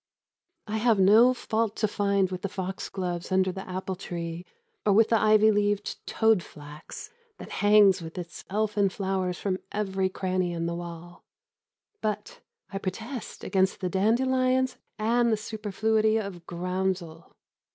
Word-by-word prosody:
I 215 Hz, +1 st, -2 dB
have 225 Hz, -1 st, +3 dB
no 215 Hz, +6 st, +6 dB
fault 225 Hz, -3 st, -1 dB
to 215 Hz, -, +1 dB
find 200 Hz, -2 st, +1 dB
with 180 Hz, -1 st, -4 dB
the 200 Hz, -, -3 dB
foxgloves 185 Hz, -2 st, -4 dB
under 185 Hz, 0 st, +3 dB
the 190 Hz, 0 st, -8 dB
apple 185 Hz, +1 st, -3 dB
tree 170 Hz, -2 st, -6 dB, 0.4 s
or 205 Hz, -, +3 dB
with 220 Hz, +2 st, +5 dB
the 225 Hz, -, +4 dB
ivy 215 Hz, 0 st, +5 dB
leaved 205 Hz, 0 st, -1 dB
toad 220 Hz, -4 st, +3 dB
flax 150 Hz, -1 st, -11 dB, 0.3 s
that -, -, -10 dB
hangs 205 Hz, -3 st, +6 dB
with 165 Hz, +2 st, -9 dB
its 175 Hz, -2 st, -7 dB
elfin 205 Hz, 0 st, +1 dB
flowers 190 Hz, -2 st, -2 dB
from 190 Hz, -2 st, -2 dB
every 195 Hz, -2 st, -1 dB
cranny 185 Hz, -1 st, -1 dB
in 165 Hz, 0 st, -2 dB
the 170 Hz, -, -1 dB
wall. 175 Hz, 0 st, -8 dB, 0.8 s
But 210 Hz, -1 st, -3 dB, 0.3 s
I 195 Hz, -, -2 dB
protest 220 Hz, +6 st, -6 dB
against 190 Hz, -1 st, +1 dB
the 185 Hz, -, -2 dB
dandelions 255 Hz, +6 st, +2 dB, 0.2 s
and 235 Hz, +2 st, +2 dB
the 220 Hz, -, +2 dB
superfluity 220 Hz, +1 st, 0 dB
of 195 Hz, -5 st, -5 dB
groundsel. 180 Hz, -1 st, -3 dB
195 Hz, 145 wpm, -27 LUFS, 180-215 Hz, 0.8 s, no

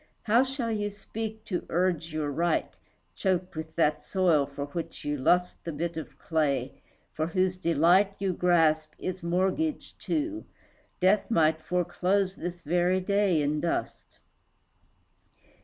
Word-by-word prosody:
How 230 Hz, +4 st, +4 dB
shall 260 Hz, -3 st, -3 dB
you 205 Hz, -1 st, -1 dB
speak 220 Hz, +2 st, -7 dB
to 185 Hz, -4 st, -2 dB
urge 170 Hz, -2 st, 0 dB
your 155 Hz, -2 st, -2 dB
right, 170 Hz, +4 st, 0 dB, 0.4 s
Choked 185 Hz, -3 st, -1 dB
with 160 Hz, 0 st, -6 dB
that 150 Hz, -2 st, +2 dB
soil 170 Hz, -7 st, +2 dB
for 140 Hz, 0 st, -5 dB
which 165 Hz, +3 st, -6 dB
you 145 Hz, 0 st, 0 dB
lust 180 Hz, +6 st, +1 dB
The 170 Hz, -, -4 dB
bit 165 Hz, +2 st, -3 dB
of 160 Hz, -, -7 dB
clay, 140 Hz, -5 st, -1 dB, 0.3 s
for 155 Hz, +1 st, -1 dB
whose 185 Hz, +1 st, 0 dB
delight 175 Hz, +5 st, +3 dB
You 195 Hz, -2 st, -1 dB
grasp, 160 Hz, -3 st, +2 dB
is 185 Hz, 0 st, -4 dB
mortgaged, 190 Hz, -, -1 dB
too; 315 Hz, 0 st, -2 dB, 0.5 s
Death 190 Hz, +3 st, +3 dB
might 160 Hz, -6 st, +3 dB
Foreclose 185 Hz, +3 st, 0 dB
this 175 Hz, -1 st, -6 dB
very 175 Hz, +4 st, +2 dB
day 190 Hz, -4 st, +2 dB
in 150 Hz, +1 st, 0 dB
dust. 170 Hz, -, -3 dB
175 Hz, 140 wpm, -28 LUFS, 160-195 Hz, 0.5 s, How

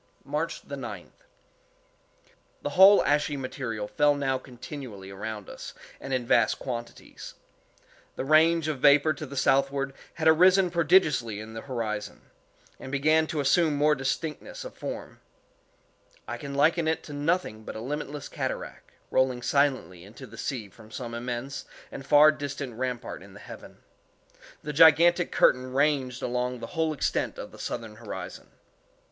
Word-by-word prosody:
March -, -, -3 dB
9th. -, -, -7 dB, 1.5 s
The -, -, -2 dB
whole 195 Hz, +2 st, +7 dB
ashy 145 Hz, 0 st, +1 dB
material 125 Hz, -5 st, -4 dB
fell 145 Hz, +5 st, +3 dB
now 135 Hz, -2 st, -1 dB
continually 125 Hz, -6 st, -9 dB
around 105 Hz, +1 st, -6 dB
us, -, -, -9 dB, 0.2 s
and 135 Hz, -, -8 dB
in 130 Hz, -2 st, 0 dB
vast 115 Hz, -2 st, +3 dB
quantities. 120 Hz, -2 st, -7 dB, 0.8 s
The -, -, -4 dB
range 160 Hz, +2 st, +4 dB
of 150 Hz, -4 st, -2 dB
vapor 145 Hz, +3 st, +5 dB
to 150 Hz, +1 st, -7 dB
the 140 Hz, -, -8 dB
southward 135 Hz, 0 st, +1 dB, 0.2 s
had 160 Hz, -, 0 dB
arisen 180 Hz, +3 st, +5 dB
prodigiously 150 Hz, -, +3 dB
in 110 Hz, +1 st, -9 dB
the 115 Hz, -, -6 dB
horizon, 110 Hz, -5 st, -4 dB, 0.6 s
and 130 Hz, -, -8 dB
began 155 Hz, +3 st, +3 dB
to 155 Hz, -3 st, -2 dB
assume 150 Hz, +2 st, +3 dB
more 150 Hz, +1 st, +3 dB
distinctness 155 Hz, -, -4 dB
of -, -, -8 dB
form. -, -, -7 dB, 1.1 s
I -, -, -4 dB
can 140 Hz, -2 st, -7 dB
liken 160 Hz, +3 st, +3 dB
it 160 Hz, -, 0 dB
to 150 Hz, -, -9 dB
nothing 145 Hz, -7 st, -1 dB
but -, -, -8 dB
a -, -, -5 dB
limitless 145 Hz, +3 st, -5 dB
cataract, -, -, -5 dB, 0.2 s
rolling 130 Hz, -2 st, +1 dB
silently 130 Hz, -, 0 dB
into 105 Hz, +4 st, -12 dB
the 115 Hz, -, -13 dB
sea 115 Hz, -2 st, -4 dB
from 110 Hz, +2 st, -17 dB
some 115 Hz, +1 st, -6 dB
immense 120 Hz, +3 st, -5 dB, 0.3 s
and 135 Hz, -, -7 dB
far 150 Hz, +2 st, +7 dB
distant 140 Hz, -3 st, -5 dB
rampart 125 Hz, +1 st, -4 dB
in -, -, -14 dB
the -, -, -11 dB
heaven. -, -, -12 dB, 0.8 s
The 150 Hz, -, -4 dB
gigantic 165 Hz, +3 st, +6 dB
curtain 130 Hz, 0 st, +3 dB
ranged 135 Hz, -3 st, +1 dB
along 125 Hz, 0 st, -1 dB
the 115 Hz, -, -7 dB
whole 160 Hz, -1 st, 0 dB
extent 150 Hz, -, -1 dB
of -, -, -8 dB
the -, -, -14 dB
southern 110 Hz, -2 st, -5 dB
horizon. 95 Hz, -5 st, -8 dB
135 Hz, 150 wpm, -27 LUFS, 120-155 Hz, 1.5 s, whole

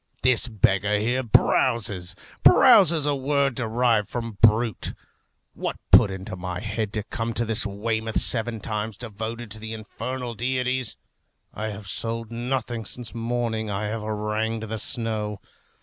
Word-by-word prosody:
This 125 Hz, -1 st, +4 dB
beggar 105 Hz, -2 st, +2 dB
here 120 Hz, +5 st, 0 dB
browses: 105 Hz, -5 st, +2 dB, 0.3 s
browses, 165 Hz, -5 st, +6 dB
a 145 Hz, -, +2 dB
word 140 Hz, 0 st, +1 dB
derived 115 Hz, -3 st, +1 dB
from 115 Hz, -4 st, -5 dB
brute. 110 Hz, -1 st, +3 dB, 0.6 s
What -, -, -3 dB, 0.2 s
put -, -, +8 dB
it 95 Hz, -, -4 dB
into 95 Hz, 0 st, -7 dB
my 90 Hz, 0 st, -5 dB
head 110 Hz, 0 st, -3 dB
to 110 Hz, -, -1 dB
come 115 Hz, -1 st, -4 dB
to 120 Hz, -, +1 dB
this 110 Hz, -1 st, +1 dB
Weymouth 110 Hz, +2 st, -1 dB
seven 115 Hz, -2 st, +2 dB
times 110 Hz, 0 st, -3 dB
devoted 110 Hz, 0 st, -6 dB
to 110 Hz, -, -5 dB
the 110 Hz, +1 st, -6 dB
infernal 120 Hz, +3 st, -5 dB
deities? 125 Hz, +1 st, -1 dB, 0.6 s
I 110 Hz, -, -4 dB
have 105 Hz, -1 st, -7 dB
sold 115 Hz, +4 st, -3 dB
nothing 120 Hz, -1 st, -2 dB
since 120 Hz, +1 st, -7 dB
morning 115 Hz, -2 st, -2 dB
I 105 Hz, +1 st, -2 dB
have 110 Hz, +1 st, -3 dB
harangued 110 Hz, +1 st, -2 dB
the 110 Hz, 0 st, -3 dB
snow. 105 Hz, -3 st, -1 dB
110 Hz, 150 wpm, -25 LUFS, 105-120 Hz, 0.6 s, put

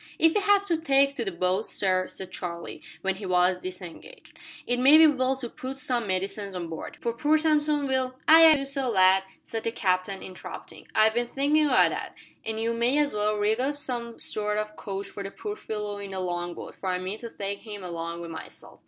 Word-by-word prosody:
"If 325 Hz, 0 st, +4 dB
we 415 Hz, -, +2 dB
have 405 Hz, 0 st, +3 dB
to 340 Hz, -4 st, +1 dB
take 275 Hz, -2 st, +3 dB
to 235 Hz, -, -1 dB
the 195 Hz, -, -2 dB
boats, 185 Hz, +4 st, 0 dB
sir," 185 Hz, -2 st, +1 dB
said 190 Hz, -1 st, -8 dB
Charlie, 170 Hz, -2 st, -6 dB, 0.2 s
when 190 Hz, 0 st, 0 dB
he 195 Hz, -1 st, -6 dB
was 180 Hz, 0 st, +3 dB
disengaged, 185 Hz, -, -10 dB, 0.3 s
"it 245 Hz, 0 st, 0 dB
may 275 Hz, +5 st, +8 dB
be 320 Hz, -, +8 dB
well 265 Hz, -3 st, +2 dB
to 255 Hz, -2 st, -3 dB
put 260 Hz, +3 st, -7 dB
some 245 Hz, -4 st, -1 dB
medicines 195 Hz, +1 st, -2 dB
on 175 Hz, -2 st, -4 dB
board, 160 Hz, -, -7 dB
for 235 Hz, -, -2 dB
poor 300 Hz, +5 st, +2 dB
Samson 300 Hz, -2 st, +2 dB
will 260 Hz, -1 st, 0 dB
" -, -, -35 dB
"Ay, 325 Hz, +1 st, +9 dB
ay, 315 Hz, -, +8 dB
do 275 Hz, -1 st, -2 dB
so, 275 Hz, -2 st, 0 dB
lad," 190 Hz, -2 st, +5 dB, 0.2 s
said 225 Hz, -1 st, -5 dB
the 230 Hz, -, -1 dB
captain, 190 Hz, -2 st, -1 dB
interrupting; 185 Hz, -, -10 dB
"I've 220 Hz, 0 st, +5 dB
been 240 Hz, +1 st, 0 dB
thinkin' 295 Hz, +4 st, +2 dB
o' -, -, 0 dB
that, 255 Hz, -, +2 dB, 0.3 s
an' 220 Hz, 0 st, -3 dB
you 230 Hz, +1 st, 0 dB
may 235 Hz, +4 st, +2 dB
as 295 Hz, -4 st, +2 dB
well 210 Hz, 0 st, +1 dB
rig 210 Hz, +2 st, +1 dB
up 280 Hz, +3 st, -1 dB
some 235 Hz, -4 st, -5 dB
sort 210 Hz, 0 st, -2 dB
o' 215 Hz, 0 st, -1 dB
couch 195 Hz, 0 st, -5 dB
for 200 Hz, -, -8 dB
the 195 Hz, -, -5 dB
poor 415 Hz, -, -6 dB
fellow 210 Hz, -, -5 dB
in 200 Hz, -1 st, -7 dB
the 190 Hz, -1 st, -4 dB
long 175 Hz, -1 st, -3 dB
boat, -, -, -8 dB
for 190 Hz, -, -5 dB
I 180 Hz, -, 0 dB
mean 185 Hz, +4 st, -4 dB
to 235 Hz, -, -7 dB
take 200 Hz, -2 st, -4 dB
him 210 Hz, -3 st, -8 dB
along 170 Hz, -1 st, -5 dB
wi' 170 Hz, -, -6 dB
myself." 165 Hz, -1 st, -10 dB
220 Hz, 230 wpm, -26 LUFS, 190-275 Hz, 0.3 s, Ay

